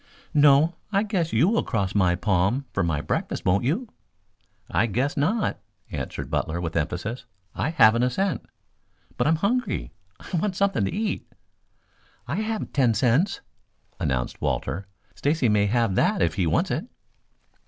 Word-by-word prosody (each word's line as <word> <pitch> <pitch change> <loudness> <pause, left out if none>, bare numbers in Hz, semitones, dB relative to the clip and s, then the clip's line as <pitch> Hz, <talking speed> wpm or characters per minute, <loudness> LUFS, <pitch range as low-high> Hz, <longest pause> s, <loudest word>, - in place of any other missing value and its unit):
"No, 150 +3 +5
I 200 0 +2
guess 190 -7 -1
you 165 - +4
will 230 +3 +2
cross 100 -5 -1
my 90 -4 +3
palm 100 +8 +1
for 100 - 0
my 85 -5 0
breakfast, - - -3
won't 95 +5 +3
you?" 195 - 0 0.8
"I 115 - +1
guess 130 - -1
not," 190 +10 0 0.3
answered - - -5
Butler 85 +2 -1
with 85 -2 -4
emphasis. 95 - -3 0.3
"I - - -1
haven't 115 -8 +5
a 125 - +3
cent." 165 - -1 0.7
"But - - +1
I'm 160 - +4
hungry. 235 +9 -1 0.3
I - - -6
want 185 +3 -1
something 195 - +1
to - - -2
eat." 215 0 -3 1.0
"I 140 +7 -2
have 220 +1 -3
ten 125 -5 +3
cents," 140 - +2 0.6
announced 65 -2 -2
Walter. 90 +8 -2 0.3
"Stacy 140 - +1
may 105 -1 +3
have 115 -2 +1
that 95 - +2
if 85 -1 +1
he 90 0 0
wants - - +1
it." - - -2
125 Hz, 155 wpm, -25 LUFS, -, 1.0 s, No